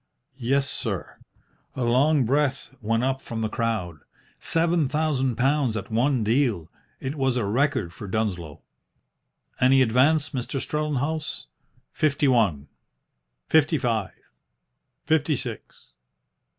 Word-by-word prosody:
"Yes, 135 +3 +1
sir." - - -4 0.6
A 130 - -2
long 130 +4 +3
breath 140 +2 0
went 115 +2 0
up 135 0 0
from 115 -3 -5
the 110 - -1
crowd. 110 -9 -2 0.4
Seven 165 -3 +1
thousand 140 -5 0
pounds 130 -2 +1
at 105 - -7
one 125 +2 +2
deal. 110 - +1 0.3
It 130 - -4
was 135 -3 0
a 120 - 0
record 125 - 0
for 100 - -8
Dunsloe. 95 -7 -3 1.0
"Any 130 +1 +5
advance, 140 +6 +3
Mr. 135 0 -3
Strellenhaus?" 150 +1 -2 0.5
"Fifty 145 -1 +1
one." 100 - +2 0.8
"Fifty 155 0 +3
five." 115 -7 -1 1.0
"Fifty 155 -1 +2
six." 120 -4 -8
130 Hz, 115 wpm, -25 LUFS, 110-145 Hz, 1.0 s, Any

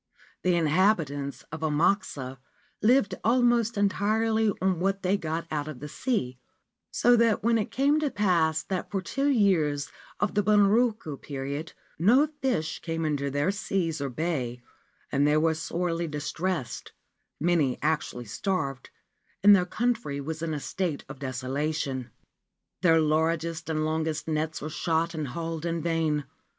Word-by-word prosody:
The 180 -1 +2
inhabitants 155 -4 +1
of 160 0 -6
Amakusa 150 -4 0 0.4
lived 220 -3 +4
almost 235 -1 +3
entirely 215 +2 +2
on 185 -2 +1
what 195 +2 0
they 185 +2 +2
got 165 -3 -3
out 150 -1 -2
of 150 -5 -7
the 150 - -6
sea, 145 - -2 0.5
so 245 +1 +4
that 230 -3 +3
when 230 0 +3
it 210 - -2
came 285 +3 +2
to 305 -2 0
pass 165 - +2
that 185 0 -3
for 200 - -1
two 275 +10 -1
years 170 - +2 0.3
of - - 0
the 205 - +3
Bunroku 210 - +3
period 140 +3 -5 0.3
no 245 - +5
fish 245 -13 -1
came 165 -1 -3
into 145 -2 -1
their 145 +6 +1
seas 180 -6 -2
or 140 - -1
bay 125 -4 -3 0.5
and 140 +2 +3
they 150 +1 +4
were 160 +1 +3
sorely 170 +1 -2
dis 150 -1 -4
tressed, 175 -7 -3 0.5
many 155 -6 +2
actually 150 -5 -1
starved, 135 - -3 0.5
and 205 0 +9
their 180 -2 +1
country 230 -12 -1
was 155 +3 -5
in 160 -2 -2
a - - -3
state 170 -1 -3
of - - -9
desolation. 130 0 -2 0.7
Their 165 -2 +5
largest 160 +1 0
and 155 -1 0
longest 160 0 -1
nets 155 0 -2
were 155 - -3
shot 165 +1 0
and 155 -3 -3
hauled 165 +4 -4
in 170 -1 -2
vain. 160 -3 0
165 Hz, 150 wpm, -27 LUFS, 150-200 Hz, 0.7 s, and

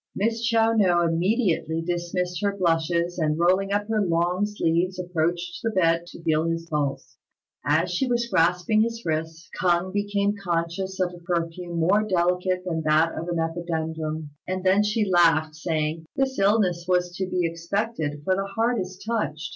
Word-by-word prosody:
Miss 225 +3 0
Chiao 225 -1 +3
no 180 -6 +3
immediately 170 -1 +1
dismissed 175 0 -2
her 200 -1 0
blushes, 170 0 +1
and 155 -1 +1
rolling 185 +3 +2
up 205 +1 0
her 220 -1 +1
long 175 +3 +1
sleeves 180 -2 0
approached 175 0 -2
the 225 - 0
bed 170 -4 +1
to 170 - -12
feel 160 0 +2
his 165 0 -2
pulse. 135 -5 -3 0.5
As 160 +5 +1
she 180 +9 0
was 240 -1 +1
grasping 180 +1 +2
his 230 +1 -2
wrist, 160 +1 -3
K'ung 180 +1 +1
became 205 0 0
conscious 190 0 -3
of 180 -1 0
a 175 - -11
perfume 170 0 -3
more 190 +6 +3
delicate 180 -2 0
than 165 -3 -2
that 155 +1 +3
of 165 - -5
the 175 - -2
epidendrum; 160 -2 -3 0.2
and 185 0 -3
then 190 +2 +4
she 210 +1 +1
laughed, 165 -4 +3
saying, 155 0 -2
"This 270 -1 0
illness 195 -4 +2
was 180 -1 +1
to 190 - -2
be 180 -1 0
expected; 165 -2 -3
for 185 +4 +2
the 195 +1 -2
heart 230 +1 +1
is 185 0 -5
touched. 190 -9 -2
175 Hz, 170 wpm, -25 LUFS, 165-195 Hz, 0.5 s, then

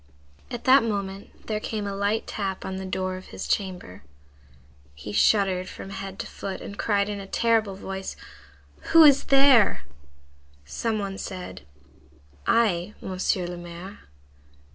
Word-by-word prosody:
At 240 - -6
that 265 +1 +7
moment 200 -3 -4
there 215 -1 -2
came 215 -1 -3
a 200 - -3
light 205 +2 0
tap 195 -2 -4
on 190 0 -4
the 190 0 -5
door 185 0 -2
of 185 - -11
his - - -6
chamber. 180 - -2 0.9
He 75 +9 -8
shuddered 185 - +3
from 195 - -9
head 195 -1 -6
to - - -4
foot, 195 -1 -6
and 200 - -8
cried 200 -1 +1
in 205 -1 -4
a 195 - -8
terrible 225 -2 +1
voice:— 190 0 -6 0.8
"Who 330 - +11
is 280 -2 +6
there?" 270 - +5 0.8
Some 220 - -2
one 195 -2 -4
said:— 135 - -7 0.8
"I, 205 -4 +2
Monsieur 185 -1 -1
le 175 0 -5
Maire." 175 +3 -9
195 Hz, 145 wpm, -25 LUFS, 185-215 Hz, 0.9 s, Who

